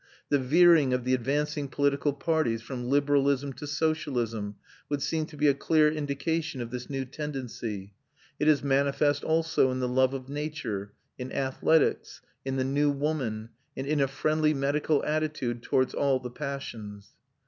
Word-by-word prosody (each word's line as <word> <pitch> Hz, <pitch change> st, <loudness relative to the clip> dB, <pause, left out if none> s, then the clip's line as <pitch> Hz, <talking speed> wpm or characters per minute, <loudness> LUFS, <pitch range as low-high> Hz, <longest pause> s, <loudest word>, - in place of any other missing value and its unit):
The 145 Hz, -, +3 dB
veering 155 Hz, 0 st, +5 dB
of 125 Hz, -1 st, 0 dB
the 130 Hz, +1 st, +1 dB
advanced 145 Hz, +4 st, 0 dB
political 140 Hz, +1 st, +1 dB
parties 140 Hz, -5 st, 0 dB
from 125 Hz, 0 st, -5 dB
liberalism 140 Hz, -1 st, +2 dB
to 145 Hz, +4 st, -8 dB
socialism 125 Hz, -9 st, -1 dB, 0.3 s
would 145 Hz, -1 st, -1 dB
seem 160 Hz, -1 st, -1 dB
to 150 Hz, -, -12 dB
be 150 Hz, -, +3 dB
a 140 Hz, -, +6 dB
clear 155 Hz, +2 st, +3 dB
indication 155 Hz, +1 st, -2 dB
of 120 Hz, -1 st, -5 dB
this 125 Hz, -1 st, -6 dB
new 135 Hz, -1 st, -2 dB
tendency. 125 Hz, -8 st, -5 dB, 0.5 s
It 150 Hz, -, +1 dB
is 150 Hz, -3 st, +4 dB
manifest 140 Hz, +1 st, +2 dB
also 160 Hz, -4 st, +2 dB
in 130 Hz, 0 st, -2 dB
the 125 Hz, -, 0 dB
love 130 Hz, +1 st, +2 dB
of 130 Hz, -1 st, -6 dB
nature, 140 Hz, -9 st, -4 dB, 0.3 s
in 125 Hz, +1 st, -5 dB
athletics, 135 Hz, +4 st, +1 dB, 0.2 s
in 135 Hz, 0 st, -2 dB
the 130 Hz, -, +1 dB
new 145 Hz, +2 st, +2 dB
woman, 135 Hz, -7 st, -2 dB, 0.3 s
and 135 Hz, -, -3 dB
in 145 Hz, 0 st, +1 dB
a 135 Hz, -, +3 dB
friendly 155 Hz, +3 st, +1 dB
medical 145 Hz, +2 st, +1 dB
attitude 150 Hz, -6 st, -1 dB
towards 130 Hz, +1 st, +1 dB
all 135 Hz, -2 st, +2 dB
the 125 Hz, -1 st, -7 dB
passions. 115 Hz, -8 st, -6 dB
140 Hz, 160 wpm, -28 LUFS, 125-150 Hz, 0.5 s, a